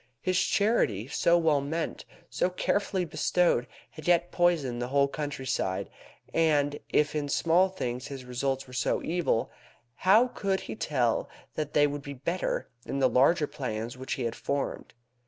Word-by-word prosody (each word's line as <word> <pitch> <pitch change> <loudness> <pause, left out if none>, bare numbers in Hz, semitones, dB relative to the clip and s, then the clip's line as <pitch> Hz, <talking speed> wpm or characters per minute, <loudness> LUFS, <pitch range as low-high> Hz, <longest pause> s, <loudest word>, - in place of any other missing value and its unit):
His 185 +7 +1
charity, 165 - +1
so 170 +3 +3
well 160 -4 +3
meant, 160 +4 -3 0.2
so - - 0
carefully 190 0 0
bestowed, 170 -4 +1 0.2
had 155 0 -10
yet 175 0 +3
poisoned 155 -9 +1
the 120 - -2
whole 140 +1 +3
countryside. 135 -9 -3 0.4
And 145 -3 +2
if 150 -1 +2
in 145 -1 -1
small 170 +6 +3
things 125 -8 -4
his 135 -3 -7
results 135 +2 -2
were 125 - -14
so 125 - 0
evil, 165 -9 0 0.5
how 220 +7 +5
could 195 -4 -1
he - - -6
tell 125 - 0 0.2
that 150 -1 -4
they 145 - +5
would 145 0 -2
be 140 -1 -7
better 170 +8 -2 0.2
in 140 - -4
the 135 -1 +4
larger 140 +7 +4
plans 120 -5 -4
which 130 +2 -4
he 130 - -3
had 115 - -2
formed? 140 -3 -3
145 Hz, 160 wpm, -28 LUFS, 130-175 Hz, 0.5 s, how